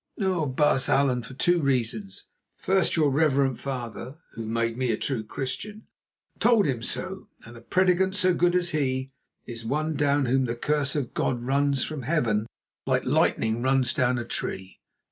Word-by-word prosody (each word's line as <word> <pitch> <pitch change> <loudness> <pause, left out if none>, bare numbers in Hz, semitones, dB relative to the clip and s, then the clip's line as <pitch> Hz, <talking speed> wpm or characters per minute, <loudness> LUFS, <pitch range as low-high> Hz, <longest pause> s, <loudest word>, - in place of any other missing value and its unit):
"Oh! 185 -6 0
Baas 135 0 +2
Allan, 135 -3 +2
for 115 +3 -11
two 175 +5 +2
reasons. 115 -8 -2 0.3
First, 190 -2 +1
your 150 -4 +3
reverend 135 -3 +2
father, 130 0 -6
who 115 -1 -7
made 115 0 -1
me 125 -3 0
true 125 -6 -2
Christian, 140 - -6 0.5
told 230 -2 +4
him 130 -5 -1
so, - - -3 0.2
and 115 +1 -12
a 115 - -12
prédicant 185 +6 +2
so 185 -3 +3
good 175 +1 +2
as 175 -1 +1
he, 130 -3 -1 0.3
is 115 -1 -7
one 155 +7 -1
down 145 -1 +2
whom 130 +1 +2
the 120 -1 -2
curse 145 +3 -1
of 140 -5 -2
God 120 -2 -1
runs 140 +1 +1
from 155 -3 -4
Heaven 115 -7 0 0.4
like - - +1
lightning 110 +1 +1
runs 130 -1 +2
down 125 -3 +1
a 120 - -3
tree. 95 -4 -4
135 Hz, 165 wpm, -26 LUFS, 120-155 Hz, 0.5 s, told